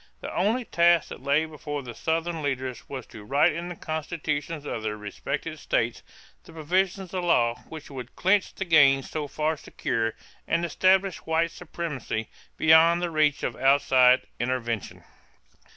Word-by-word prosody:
The -, -, -7 dB
only 225 Hz, +7 st, +1 dB
task 170 Hz, -3 st, +3 dB
that -, -, -9 dB
lay 140 Hz, +3 st, +2 dB
before 150 Hz, -2 st, -6 dB
the 120 Hz, -2 st, -8 dB
Southern 165 Hz, +4 st, -2 dB
leaders 130 Hz, -3 st, -4 dB
was 135 Hz, -2 st, -6 dB
to 110 Hz, -4 st, -12 dB
write 140 Hz, +8 st, +3 dB
in 170 Hz, +3 st, -5 dB
the 175 Hz, -, -6 dB
constitutions 155 Hz, -1 st, -4 dB
of 115 Hz, -, -4 dB
their 105 Hz, -1 st, -3 dB
respective 105 Hz, -1 st, -5 dB
states -, -, -1 dB, 0.4 s
the 165 Hz, -, -15 dB
provisions 185 Hz, +4 st, -1 dB
of 185 Hz, -1 st, -2 dB
law 120 Hz, -9 st, +2 dB
which 155 Hz, -2 st, -9 dB
would 130 Hz, -3 st, -8 dB
clinch 190 Hz, +2 st, +2 dB
the 190 Hz, -, -3 dB
gains 140 Hz, -5 st, +4 dB
so 150 Hz, -2 st, -3 dB
far 155 Hz, +2 st, -1 dB
secured 115 Hz, -5 st, -2 dB, 0.3 s
and 170 Hz, +1 st, +1 dB
establish 190 Hz, +3 st, +2 dB
white 165 Hz, +1 st, +1 dB
supremacy 150 Hz, -11 st, -5 dB, 0.3 s
beyond 160 Hz, +2 st, +6 dB
the 175 Hz, -1 st, -2 dB
reach 150 Hz, -2 st, +2 dB
of -, -, -2 dB
outside 130 Hz, -2 st, +4 dB, 0.2 s
intervention. 120 Hz, -3 st, -3 dB
155 Hz, 155 wpm, -26 LUFS, 130-170 Hz, 0.4 s, beyond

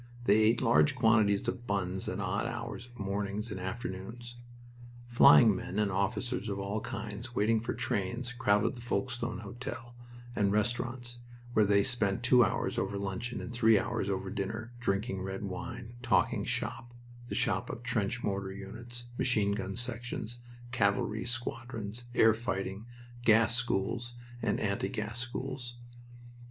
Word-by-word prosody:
They 105 Hz, -2 st, +5 dB
ate 110 Hz, +2 st, +4 dB
large 130 Hz, +4 st, +4 dB
quantities 110 Hz, -4 st, +4 dB
of 120 Hz, -1 st, -3 dB
buns 95 Hz, -2 st, -1 dB
at -, -, -3 dB
odd -, -, -1 dB
hours 120 Hz, -, -5 dB
of 120 Hz, 0 st, -17 dB
mornings 100 Hz, +2 st, -2 dB
and 95 Hz, -, -4 dB
afternoons. 115 Hz, +4 st, -6 dB, 0.7 s
Flying 120 Hz, -2 st, +7 dB
men 95 Hz, +1 st, -5 dB
and 105 Hz, -1 st, +2 dB
officers 110 Hz, +4 st, -1 dB
of 100 Hz, -, -2 dB
all 100 Hz, +2 st, -2 dB
kinds 110 Hz, +4 st, -6 dB
waiting 110 Hz, +1 st, +3 dB
for 115 Hz, -, -3 dB
trains 115 Hz, +6 st, -2 dB
crowded 105 Hz, -4 st, +2 dB
the 120 Hz, -, -9 dB
Folkestone 120 Hz, -3 st, -2 dB
Hotel 120 Hz, +3 st, -7 dB, 0.4 s
and 100 Hz, -1 st, +2 dB
restaurants, 120 Hz, +3 st, -1 dB, 0.3 s
where 110 Hz, -, +5 dB
they 100 Hz, 0 st, +5 dB
spent 110 Hz, -4 st, +1 dB
two 120 Hz, 0 st, +6 dB
hours -, -, 0 dB
over 100 Hz, -, -1 dB
luncheon 100 Hz, +5 st, -3 dB
and 120 Hz, -, -6 dB
three 115 Hz, -2 st, +5 dB
hours 95 Hz, -, -1 dB
over 95 Hz, -1 st, -2 dB
dinner, 110 Hz, +3 st, -4 dB
drinking 100 Hz, -3 st, -1 dB
red 95 Hz, +1 st, -4 dB
wine, 100 Hz, +4 st, -6 dB
talking 120 Hz, -1 st, +2 dB
"shop" 120 Hz, 0 st, -3 dB, 0.3 s
the -, -, -3 dB
shop -, -, 0 dB
of 120 Hz, -, -6 dB
trench 120 Hz, -1 st, -1 dB
mortar 100 Hz, -1 st, -1 dB
units, 120 Hz, +5 st, -8 dB
machine 105 Hz, -5 st, +2 dB
gun 100 Hz, -1 st, -3 dB
sections, 120 Hz, -1 st, -4 dB, 0.3 s
cavalry 105 Hz, -1 st, +1 dB
squadrons, 120 Hz, -2 st, -4 dB
air 110 Hz, -1 st, +7 dB
fighting, 100 Hz, -1 st, -3 dB, 0.4 s
gas 115 Hz, 0 st, +5 dB
schools, 120 Hz, +1 st, 0 dB, 0.3 s
and 110 Hz, -3 st, +1 dB
anti 100 Hz, -2 st, 0 dB
gas 110 Hz, -1 st, -4 dB
schools. 125 Hz, 0 st, -4 dB
110 Hz, 145 wpm, -31 LUFS, 100-120 Hz, 0.7 s, Flying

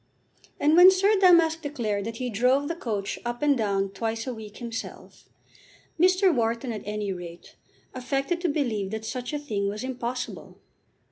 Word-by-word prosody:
And 300 Hz, +2 st, +4 dB
when 355 Hz, +2 st, +10 dB
Sir 390 Hz, +3 st, +3 dB
Damask 335 Hz, -3 st, +5 dB
declared 220 Hz, -9 st, -3 dB
that 225 Hz, 0 st, -5 dB
he 250 Hz, 0 st, -3 dB
drove 255 Hz, +6 st, +2 dB
the 335 Hz, -, -3 dB
coach 210 Hz, -, -4 dB
up 240 Hz, +2 st, -4 dB
and 290 Hz, -1 st, +4 dB
down 200 Hz, -4 st, 0 dB
twice 225 Hz, +3 st, -3 dB
a 255 Hz, -, -3 dB
week 215 Hz, -2 st, -10 dB
himself, 230 Hz, -2 st, -8 dB, 0.7 s
Mr. 370 Hz, +1 st, +4 dB
Wharton 235 Hz, 0 st, -1 dB
at 215 Hz, -, -5 dB
any 210 Hz, -1 st, -3 dB
rate 175 Hz, -1 st, -10 dB, 0.4 s
affected 275 Hz, +6 st, -2 dB
to 350 Hz, -, +1 dB
believe 235 Hz, -10 st, -1 dB
that 220 Hz, +1 st, -5 dB
such 250 Hz, +2 st, -4 dB
a 300 Hz, -, -2 dB
thing 210 Hz, -9 st, -2 dB
was 210 Hz, +4 st, -5 dB
impossible. 250 Hz, -1 st, -5 dB
245 Hz, 165 wpm, -26 LUFS, 215-295 Hz, 0.7 s, when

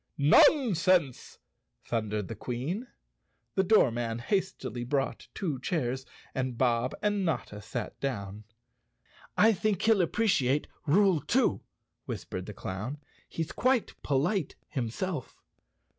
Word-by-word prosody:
" -, -, -48 dB, 0.2 s
"Nonsense!" 185 Hz, -, +4 dB, 0.5 s
thundered 105 Hz, -3 st, -2 dB
the -, -, -5 dB
Queen. 135 Hz, -, -4 dB, 0.7 s
The 190 Hz, -, +3 dB
doormen 120 Hz, -, +3 dB
hastily 185 Hz, -, -2 dB
brought 135 Hz, +2 st, -2 dB
two 155 Hz, -9 st, -2 dB
chairs 130 Hz, -4 st, -2 dB, 0.3 s
and 130 Hz, -2 st, -2 dB
Bob 120 Hz, 0 st, +1 dB
and 205 Hz, -1 st, +1 dB
Notta 120 Hz, -, -2 dB
sat 110 Hz, +2 st, -5 dB
down. 105 Hz, -6 st, -4 dB, 0.9 s
"I 220 Hz, +2 st, +6 dB
think 205 Hz, 0 st, 0 dB
he'll 220 Hz, -3 st, +5 dB
appreciate 155 Hz, -, +2 dB, 0.2 s
rule 190 Hz, +2 st, +4 dB
two," -, -, +2 dB, 0.4 s
whispered 95 Hz, 0 st, -5 dB
the 105 Hz, -, -6 dB
clown. 105 Hz, +10 st, -5 dB, 0.3 s
"He's 165 Hz, -1 st, -3 dB
quite 255 Hz, -2 st, +1 dB
polite 150 Hz, +5 st, 0 dB
himself." 135 Hz, +4 st, -3 dB
140 Hz, 115 wpm, -29 LUFS, 120-190 Hz, 0.9 s, I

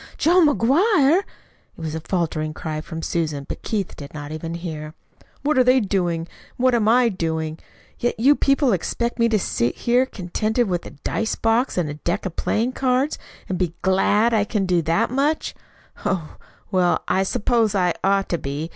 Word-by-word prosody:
"John 345 Hz, +1 st, +5 dB
McGuire!" 295 Hz, -, +4 dB
It -, -, -5 dB, 0.6 s
was 160 Hz, -2 st, -4 dB
a 160 Hz, -, -3 dB
faltering 160 Hz, -3 st, -2 dB
cry 155 Hz, -1 st, -4 dB
from 160 Hz, 0 st, -7 dB
Susan, 155 Hz, -4 st, -2 dB
but -, -, -6 dB
Keith 205 Hz, -4 st, -3 dB
did 145 Hz, +1 st, -10 dB
not 145 Hz, 0 st, -6 dB
even 165 Hz, +2 st, -5 dB
hear. 155 Hz, -2 st, -6 dB, 0.5 s
"What 295 Hz, -1 st, +2 dB
are -, -, +6 dB
they 255 Hz, +1 st, +5 dB
doing, 180 Hz, -6 st, 0 dB
and 165 Hz, -, -9 dB, 0.3 s
what 255 Hz, 0 st, +3 dB
am 225 Hz, -3 st, +2 dB
I 240 Hz, +2 st, +5 dB
doing? 160 Hz, -5 st, -2 dB, 0.4 s
Yet 240 Hz, -1 st, -1 dB
you 275 Hz, +5 st, +5 dB
people 275 Hz, -4 st, +2 dB
expect 235 Hz, +7 st, -2 dB
me 230 Hz, 0 st, +4 dB
to 220 Hz, -, +3 dB
sit 120 Hz, -, -1 dB
here 245 Hz, +2 st, +2 dB
contented 215 Hz, +4 st, -1 dB
with 175 Hz, -2 st, -2 dB
a 145 Hz, -, -13 dB
dice 220 Hz, 0 st, -1 dB
box 225 Hz, +2 st, +1 dB
and 175 Hz, -4 st, +1 dB
a 145 Hz, -, -4 dB
deck 175 Hz, +4 st, -1 dB
of 180 Hz, -, -4 dB
playing 230 Hz, +4 st, 0 dB
cards, 260 Hz, +2 st, 0 dB, 0.3 s
and 185 Hz, -, -3 dB
be 175 Hz, -2 st, -1 dB
GLAD 205 Hz, +4 st, +3 dB
I 215 Hz, -2 st, +3 dB
can 205 Hz, -1 st, -1 dB
do 180 Hz, -2 st, +2 dB
that 165 Hz, +9 st, +1 dB
much. 285 Hz, +4 st, 0 dB, 0.5 s
Oh, 170 Hz, -5 st, -2 dB, 0.3 s
well, 180 Hz, -2 st, +2 dB
I 190 Hz, -, +2 dB
suppose 215 Hz, +2 st, +1 dB
I 180 Hz, -3 st, +2 dB
ought 195 Hz, 0 st, +2 dB
to 170 Hz, -, -1 dB
be. 145 Hz, +4 st, -4 dB
195 Hz, 190 wpm, -22 LUFS, 165-245 Hz, 0.6 s, are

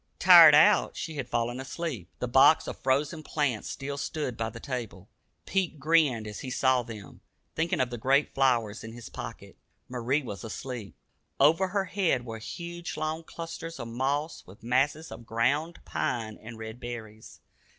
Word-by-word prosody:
Tired -, -, +9 dB
out, -, -, +5 dB
she 160 Hz, -, -4 dB
had 130 Hz, -3 st, -4 dB
fallen 120 Hz, +2 st, -1 dB
asleep. 135 Hz, -, -5 dB
The 125 Hz, -, -3 dB
box 135 Hz, +5 st, +6 dB
of -, -, -6 dB
frozen 145 Hz, +5 st, 0 dB
plants 145 Hz, -7 st, -1 dB
still 140 Hz, +1 st, -5 dB
stood 145 Hz, -5 st, -3 dB
by 115 Hz, 0 st, -2 dB
the 115 Hz, -, -10 dB
table. 115 Hz, -7 st, -6 dB, 0.4 s
Pete 190 Hz, -5 st, -1 dB
grinned 145 Hz, -6 st, +2 dB
as 105 Hz, -1 st, -7 dB
he 130 Hz, -, -6 dB
saw 130 Hz, 0 st, +2 dB
them, 110 Hz, -5 st, -10 dB, 0.3 s
thinking 165 Hz, +1 st, -1 dB
of 125 Hz, -1 st, 0 dB
the 120 Hz, -, -5 dB
great 135 Hz, +5 st, +2 dB
flowers 120 Hz, -6 st, +1 dB
in 110 Hz, 0 st, -8 dB
his 120 Hz, 0 st, -10 dB
pocket. -, -, -9 dB, 0.3 s
Marie 125 Hz, +4 st, -1 dB
was 105 Hz, -4 st, -7 dB
asleep. 115 Hz, -2 st, -6 dB, 0.4 s
Over 165 Hz, +5 st, +5 dB
her 195 Hz, +1 st, -1 dB
head 180 Hz, -10 st, 0 dB
were 115 Hz, -2 st, -7 dB
hung 170 Hz, +4 st, -7 dB
long 155 Hz, +1 st, -2 dB
clusters 165 Hz, -1 st, -7 dB
of 120 Hz, -2 st, -6 dB
moss, 140 Hz, +6 st, -2 dB
with 95 Hz, +4 st, -15 dB
masses 140 Hz, +6 st, 0 dB
of 120 Hz, -, -10 dB
ground 140 Hz, +9 st, 0 dB
pine 115 Hz, -4 st, -2 dB
and 115 Hz, +1 st, -9 dB
red 110 Hz, +1 st, -8 dB
berries. 110 Hz, -3 st, -9 dB
130 Hz, 170 wpm, -28 LUFS, 115-155 Hz, 0.4 s, Tired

